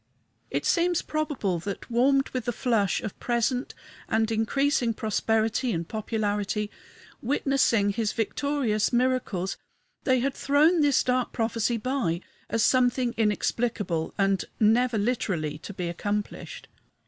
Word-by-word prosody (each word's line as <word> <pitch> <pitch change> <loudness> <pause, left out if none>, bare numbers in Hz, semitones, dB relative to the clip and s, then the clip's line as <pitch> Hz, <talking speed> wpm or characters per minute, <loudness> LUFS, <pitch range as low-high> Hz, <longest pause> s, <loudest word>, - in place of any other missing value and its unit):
It - - -2
seems 350 0 +2
probable 295 - -1
that, 200 +7 -6
warmed 270 +3 +3
with 255 -3 -4
the 240 - 0
flush 220 -5 +1
of 210 - -6
present 245 +2 -1 0.3
and 220 0 +1
increasing 235 +2 +1
prosperity 220 +3 0
and 170 -4 -2
popularity, 210 -1 -2 0.5
witnessing 245 -5 +2
his 215 0 -1
victorious 230 -2 0
miracles, 240 -7 0 0.5
they 260 -2 +3
had 270 +2 0
thrown 305 +6 +3
this 285 -2 +3
dark 250 -1 0
prophecy 230 0 0
by, 225 -8 -1 0.3
as 230 -1 +2
something 250 -1 +2
inexplicable 210 -5 0
and 195 -1 +1
never 230 +2 +3
literally 185 -9 -1
to 205 - -8
be 180 -3 -4
accomplished. 205 +4 -4
230 Hz, 125 wpm, -26 LUFS, 205-255 Hz, 0.5 s, warmed